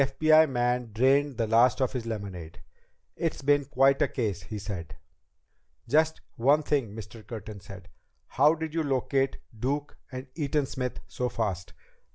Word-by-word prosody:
The 135 Hz, -, +4 dB
FBI 155 Hz, +2 st, +5 dB
man 120 Hz, -2 st, 0 dB
drained 135 Hz, +2 st, +3 dB
the 115 Hz, -, +1 dB
last 115 Hz, +4 st, +4 dB
of 130 Hz, -2 st, 0 dB
his 120 Hz, -3 st, -4 dB
lemonade. 95 Hz, -7 st, -6 dB, 0.6 s
"It's 165 Hz, -3 st, -3 dB
been 145 Hz, 0 st, +3 dB
quite 135 Hz, 0 st, +3 dB
a -, -, +4 dB
case," 105 Hz, -8 st, -2 dB
he 110 Hz, -, -7 dB
said. 95 Hz, -6 st, -6 dB, 0.9 s
"Just 160 Hz, +2 st, +2 dB, 0.2 s
one 140 Hz, +6 st, +4 dB
other 150 Hz, -, -15 dB
thing," 125 Hz, -8 st, 0 dB
Mr. 110 Hz, +1 st, -9 dB
Curtin 110 Hz, -2 st, -7 dB
said. 100 Hz, -2 st, -11 dB, 0.4 s
"How 150 Hz, +4 st, +3 dB
did 160 Hz, -1 st, -5 dB
you 165 Hz, -, 0 dB
locate 135 Hz, -1 st, 0 dB, 0.2 s
Duke 140 Hz, +6 st, -2 dB, 0.2 s
and 130 Hz, 0 st, -6 dB
Eaton 150 Hz, -2 st, 0 dB
Smith 130 Hz, -2 st, -4 dB
so 125 Hz, 0 st, -2 dB
fast?" 100 Hz, -7 st, -3 dB
130 Hz, 165 wpm, -28 LUFS, 110-145 Hz, 0.9 s, FBI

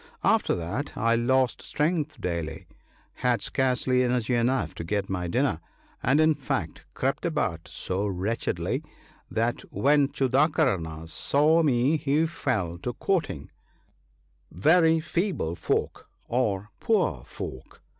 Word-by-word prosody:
After -, -, +3 dB
that 90 Hz, -, -4 dB
I 115 Hz, +1 st, +2 dB
lost 125 Hz, +2 st, +2 dB
strength 155 Hz, 0 st, -1 dB
daily, 85 Hz, -1 st, -3 dB, 0.5 s
had 125 Hz, -2 st, +1 dB
scarcely 130 Hz, -1 st, +1 dB
energy 125 Hz, -1 st, +1 dB
enough 125 Hz, +2 st, +1 dB
to -, -, -6 dB
get 95 Hz, +2 st, -2 dB
my 90 Hz, -2 st, -2 dB
dinner, 125 Hz, -, +1 dB, 0.4 s
and, 135 Hz, +5 st, +3 dB
in 155 Hz, 0 st, +5 dB
fact, 140 Hz, -3 st, -4 dB
crept 135 Hz, +1 st, -1 dB
about 115 Hz, -, -1 dB
so 95 Hz, +3 st, -2 dB
wretchedly, 100 Hz, +4 st, -2 dB, 0.5 s
that 115 Hz, +2 st, 0 dB
when 145 Hz, 0 st, +3 dB
Chudakarna 130 Hz, -, +1 dB
saw 150 Hz, -, +3 dB
me 140 Hz, 0 st, +3 dB
he 150 Hz, +2 st, +1 dB
fell 95 Hz, -, -2 dB
to 120 Hz, +7 st, -3 dB
quoting, 165 Hz, -, -2 dB, 0.3 s
— -, -, -40 dB
" -, -, -41 dB
Very 160 Hz, -, +4 dB
feeble 165 Hz, -, -1 dB
folk 85 Hz, -, -2 dB, 0.2 s
are 105 Hz, -5 st, -1 dB
poor 180 Hz, -, +1 dB
folk 65 Hz, -, -9 dB
125 Hz, 125 wpm, -26 LUFS, 95-150 Hz, 0.5 s, in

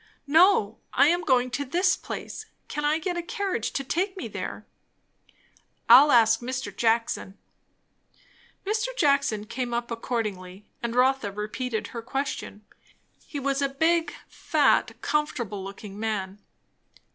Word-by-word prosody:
"No. 300 Hz, -, +4 dB
I 290 Hz, -, +5 dB
am 350 Hz, +1 st, +2 dB
going 255 Hz, -4 st, +2 dB
to 285 Hz, +3 st, -2 dB
this 360 Hz, +7 st, +2 dB
place. -, -, -7 dB, 0.2 s
Can 295 Hz, -, -4 dB
I 300 Hz, +1 st, +3 dB
get 350 Hz, +2 st, -3 dB
a -, -, -1 dB
carriage 390 Hz, -, -2 dB
to 275 Hz, -, -2 dB
take 375 Hz, +8 st, -2 dB
me -, -, -4 dB
there?" -, -, -6 dB, 1.2 s
"I'll 265 Hz, +6 st, +8 dB
ask 225 Hz, -1 st, +5 dB
Mr. 255 Hz, +1 st, -5 dB
Jackson." 225 Hz, -4 st, 0 dB, 1.3 s
Mr. 435 Hz, +4 st, 0 dB
Jackson 280 Hz, -, +2 dB
came 245 Hz, +1 st, -3 dB
up 235 Hz, 0 st, -3 dB
accordingly, 210 Hz, -5 st, -4 dB, 0.2 s
and 235 Hz, 0 st, -3 dB
Rotha 255 Hz, -4 st, +2 dB
repeated 215 Hz, +3 st, -4 dB
her 230 Hz, -, -6 dB
question. 230 Hz, -4 st, -4 dB, 0.6 s
He 290 Hz, -, -5 dB
was 275 Hz, 0 st, -1 dB
a 275 Hz, -, +1 dB
big, 325 Hz, +4 st, +1 dB, 0.2 s
fat, -, -, +1 dB
comfortable 240 Hz, -10 st, -1 dB
looking 200 Hz, +1 st, -9 dB
man. 205 Hz, -3 st, -3 dB
255 Hz, 135 wpm, -26 LUFS, 220-300 Hz, 1.3 s, I'll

